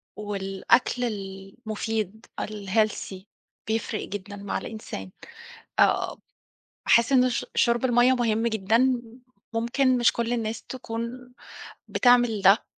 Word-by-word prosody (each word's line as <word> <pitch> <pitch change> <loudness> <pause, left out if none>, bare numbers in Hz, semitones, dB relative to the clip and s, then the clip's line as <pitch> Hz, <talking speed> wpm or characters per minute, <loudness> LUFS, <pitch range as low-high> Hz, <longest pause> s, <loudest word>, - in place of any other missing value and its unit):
والأكل 205 +4 0
المفيد، 215 +1 -4 0.2
الhealthy، 205 -2 -1 0.4
بيفرِّق 220 -1 -2
جدًا 205 0 -6
مع 200 0 -3
الإنسان. 95 - -7 0.7
آآ، - - +3 0.7
باحِس 235 +2 +4
إنه 255 -1 +5
ش 245 - -2
شُرب 235 +1 +3
المَيّه 245 +1 +4
مهم 230 -2 +1
جدًا، 230 +4 +2 0.5
ممكن 250 +3 +2
مش 240 -1 +4
كل 235 0 -1
الناس 225 -1 -3
تكون 245 0 -6 0.5
بتعمل 245 -4 +3
ده، 195 +3 +5
225 Hz, 105 wpm, -26 LUFS, 205-240 Hz, 0.7 s, إنه